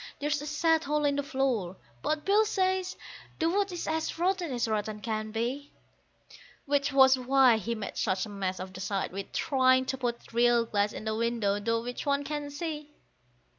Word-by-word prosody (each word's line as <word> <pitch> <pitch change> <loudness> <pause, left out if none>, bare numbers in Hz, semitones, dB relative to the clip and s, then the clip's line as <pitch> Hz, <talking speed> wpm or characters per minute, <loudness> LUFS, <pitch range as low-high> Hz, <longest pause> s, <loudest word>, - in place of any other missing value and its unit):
There's 295 0 -1
a 295 - -6
sad 320 +2 +2
hole 300 +1 0
in 285 -1 +2
the 285 - 0
floor, 260 - -1 0.2
but 305 - -1
Bill 410 +2 +5
says 375 -3 0 0.4
the 325 - +1
wood 400 +1 +1
is 350 - -5
as 320 0 -2
rotten 355 -2 0
as 240 -2 0
rotten 215 -1 -2
can 215 0 -3
be: 245 +6 -3 0.9
Which 285 0 +1
was 265 -1 +6
why 255 -2 +5
he 230 +3 -3
made 215 -2 -6
such 190 -1 0
a - - -10
mess 190 -2 -3
of 185 +1 -7
the 185 - -8
side 195 0 -2
with 195 +2 -6
trying 260 -2 +3
to 265 0 -3
put 235 -2 -4
real 240 0 +4
glass 205 -1 0
in - - -8
the 220 0 -1
window, 225 -3 0
through 230 +1 0
which 245 +4 -5
one 280 0 +2
can 295 0 -4
see. 300 0 -5
260 Hz, 195 wpm, -29 LUFS, 220-300 Hz, 0.9 s, was